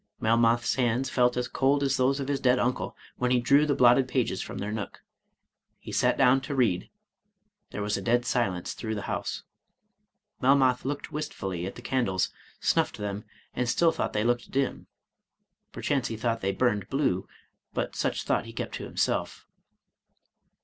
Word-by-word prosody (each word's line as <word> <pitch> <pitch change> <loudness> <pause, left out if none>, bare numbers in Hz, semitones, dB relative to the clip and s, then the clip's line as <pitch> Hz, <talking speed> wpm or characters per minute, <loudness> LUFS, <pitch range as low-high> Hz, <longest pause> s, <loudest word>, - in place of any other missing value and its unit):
Melmoth's 115 +1 +3
hands 125 +1 +1
felt 125 -1 +2
as 125 0 0
cold 140 +1 +2
as 135 -1 +2
those 135 +1 +2
of 135 - -3
his 140 -1 0
dead 125 -1 +3
uncle, 125 0 -1 0.2
when 125 - 0
he 125 0 +3
drew 140 +5 +4
the 145 - +2
blotted 125 +1 +5
pages 120 -7 0
from - - -6
their 105 +1 -3
nook. 110 -2 -6 0.7
He - - -10
sat - - +2
down 135 0 +5
to 140 +1 -4
read, 105 -9 +1 0.4
— 205 0 -49
^there 105 - -4
was 105 0 0
a - - -4
dead 120 +4 +2
silence 100 -9 -1
through 110 -1 -4
the 100 - -4
house. - - -3 1.0
Melmoth 130 -1 +4
looked 145 +1 -4
wistfully 95 - -4
at - - -7
the 120 - -11
candles, 100 -10 0 0.3
snuffed - - +1
them, 105 0 -4 0.3
and 125 -1 -1
still 165 +6 +4
thought - - -2
they 105 - +1
looked 120 +1 0
dim, 135 0 -1 0.8
(perchance 135 -4 -1
he 110 - -5
thought 115 0 -1
they 95 - 0
burned 105 -2 0
blue, 135 -10 0 0.5
but - - -2
such - - -1
thought - - 0
he - - -9
kept - - -5
to - - -5
himself). - - -1
125 Hz, 175 wpm, -27 LUFS, 110-135 Hz, 1.0 s, blotted